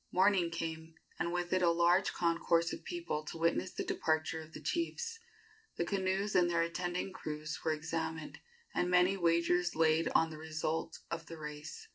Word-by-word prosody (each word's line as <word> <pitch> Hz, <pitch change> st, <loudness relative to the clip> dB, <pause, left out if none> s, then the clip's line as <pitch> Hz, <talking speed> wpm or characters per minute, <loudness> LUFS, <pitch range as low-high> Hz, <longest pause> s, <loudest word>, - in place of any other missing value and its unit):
Morning 185 Hz, -2 st, +4 dB
came, 160 Hz, -1 st, -5 dB, 0.2 s
and 170 Hz, -, 0 dB
with 175 Hz, 0 st, -1 dB
it 185 Hz, -, +3 dB
a 175 Hz, -, +5 dB
large 175 Hz, +3 st, +4 dB
concourse 170 Hz, 0 st, +2 dB
of -, -, -7 dB
people 345 Hz, -, -3 dB
to 165 Hz, -, -6 dB
witness 170 Hz, +3 st, +1 dB
the -, -, -3 dB
departure 160 Hz, -, 0 dB
of 160 Hz, 0 st, -12 dB
the -, -, -7 dB
chiefs. 455 Hz, +7 st, -2 dB, 0.6 s
The 170 Hz, -, +1 dB
canoes 195 Hz, +2 st, 0 dB
and 175 Hz, -1 st, +4 dB
their 170 Hz, -1 st, +2 dB
attending 175 Hz, +2 st, -2 dB
crews 155 Hz, -2 st, -5 dB
were 160 Hz, -, +2 dB
examined, 160 Hz, 0 st, -4 dB, 0.3 s
and 180 Hz, -, +1 dB
many 180 Hz, +2 st, +5 dB
wagers 175 Hz, 0 st, +2 dB
laid 160 Hz, 0 st, +3 dB
on 160 Hz, 0 st, +4 dB
the 155 Hz, -, -8 dB
result 160 Hz, 0 st, -2 dB
of 165 Hz, -1 st, -4 dB
the 165 Hz, -, -8 dB
race. 150 Hz, -, -7 dB
170 Hz, 175 wpm, -34 LUFS, 160-180 Hz, 0.6 s, a